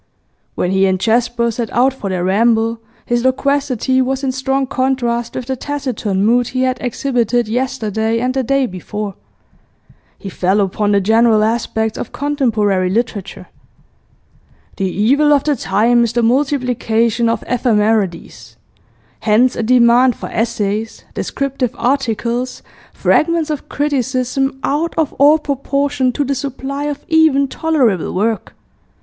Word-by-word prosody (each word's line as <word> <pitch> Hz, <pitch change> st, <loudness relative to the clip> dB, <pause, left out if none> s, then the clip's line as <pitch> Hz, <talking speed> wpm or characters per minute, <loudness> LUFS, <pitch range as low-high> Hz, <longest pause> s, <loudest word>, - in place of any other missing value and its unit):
When 180 Hz, -, -1 dB
he 195 Hz, 0 st, +3 dB
and 190 Hz, -1 st, 0 dB
Jasper 235 Hz, +2 st, +1 dB
set 230 Hz, 0 st, -4 dB
out 255 Hz, +3 st, +2 dB
for 210 Hz, -7 st, -6 dB
their 180 Hz, -2 st, -2 dB
ramble, 225 Hz, +4 st, +2 dB, 0.3 s
his 240 Hz, 0 st, 0 dB
loquacity 260 Hz, -1 st, +1 dB
was 265 Hz, +1 st, -1 dB
in 265 Hz, -, 0 dB
strong 265 Hz, +1 st, -1 dB
contrast 255 Hz, -3 st, -1 dB
with 255 Hz, -, -4 dB
the 265 Hz, +1 st, -2 dB
taciturn 245 Hz, -8 st, -2 dB
mood 240 Hz, +2 st, +3 dB
he 255 Hz, 0 st, -1 dB
had 255 Hz, -1 st, 0 dB
exhibited 245 Hz, -2 st, 0 dB
yesterday 225 Hz, -2 st, -1 dB
and 250 Hz, +2 st, -1 dB
the 265 Hz, -, 0 dB
day 275 Hz, +2 st, +1 dB
before. 205 Hz, +1 st, -5 dB, 1.0 s
He 200 Hz, -, -9 dB
fell 190 Hz, +1 st, 0 dB
upon 205 Hz, +1 st, 0 dB
the 200 Hz, -1 st, +3 dB
general 220 Hz, +1 st, +3 dB
aspects 220 Hz, -1 st, -1 dB
of -, -, -5 dB
contemporary 220 Hz, -10 st, 0 dB
literature. 210 Hz, -2 st, -3 dB, 0.6 s
'... -, -, -34 dB
The 195 Hz, -2 st, -1 dB
evil 275 Hz, +11 st, +2 dB
of 285 Hz, -1 st, +2 dB
the 295 Hz, -1 st, +1 dB
time 235 Hz, +1 st, +2 dB
is 235 Hz, -1 st, -1 dB
the 240 Hz, 0 st, +1 dB
multiplication 240 Hz, -3 st, +1 dB
of 230 Hz, -, -1 dB
ephemerides. 215 Hz, -6 st, -1 dB, 0.6 s
Hence 235 Hz, +4 st, +2 dB
a -, -, -2 dB
demand 245 Hz, +1 st, +4 dB
for -, -, -7 dB
essays, 220 Hz, -1 st, -2 dB
descriptive 275 Hz, -3 st, -3 dB
articles, 245 Hz, -1 st, -1 dB, 0.3 s
fragments 330 Hz, -1 st, +1 dB
of 295 Hz, -, -5 dB
criticism, 265 Hz, -1 st, -1 dB
out 305 Hz, +4 st, -1 dB
of 315 Hz, -3 st, 0 dB
all 290 Hz, +3 st, +6 dB
proportion 280 Hz, -2 st, -1 dB
to 290 Hz, -, 0 dB
the 280 Hz, 0 st, -1 dB
supply 275 Hz, +1 st, -4 dB
of 295 Hz, -1 st, -5 dB
even 315 Hz, -4 st, +3 dB
tolerable 265 Hz, -, 0 dB
work. 220 Hz, +3 st, -1 dB
245 Hz, 140 wpm, -17 LUFS, 220-270 Hz, 1.0 s, all